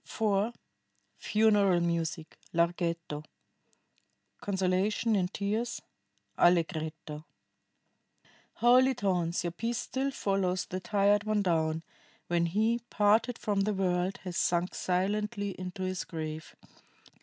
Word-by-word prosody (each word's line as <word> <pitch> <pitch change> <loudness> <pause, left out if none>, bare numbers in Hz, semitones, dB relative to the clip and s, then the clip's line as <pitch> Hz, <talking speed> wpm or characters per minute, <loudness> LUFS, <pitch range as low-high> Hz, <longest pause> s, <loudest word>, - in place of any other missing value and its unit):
[IV. 215 +1 0 0.6
FUNERAL 205 -4 +3
MUSIC: 170 -1 -2 0.2
Larghetto. 170 -2 -1 1.2
CONSOLATION 195 +3 +1
IN 185 -3 +2
TEARS: 215 +5 -2 0.6
Allegretto] 160 -3 +1 1.3
"Holy 255 +2 +5
tones, 180 -7 0
your 175 - -2
peace 230 +7 -2
still 265 +2 -2
follows 195 -7 0
the 185 - -4
tired 205 +2 +2
one 215 -1 +1
down, 160 -2 0 0.4
when 170 -1 +1
he, 220 +6 +1
parted 220 +4 +3
from 205 -2 -1
the 205 +1 0
world, 185 0 0
has 180 -2 -5
sunk 175 +1 +1
silently 205 +3 -1
into 185 +1 -5
his 185 0 -2
grave. 155 -1 -6
190 Hz, 105 wpm, -30 LUFS, 170-210 Hz, 1.3 s, Holy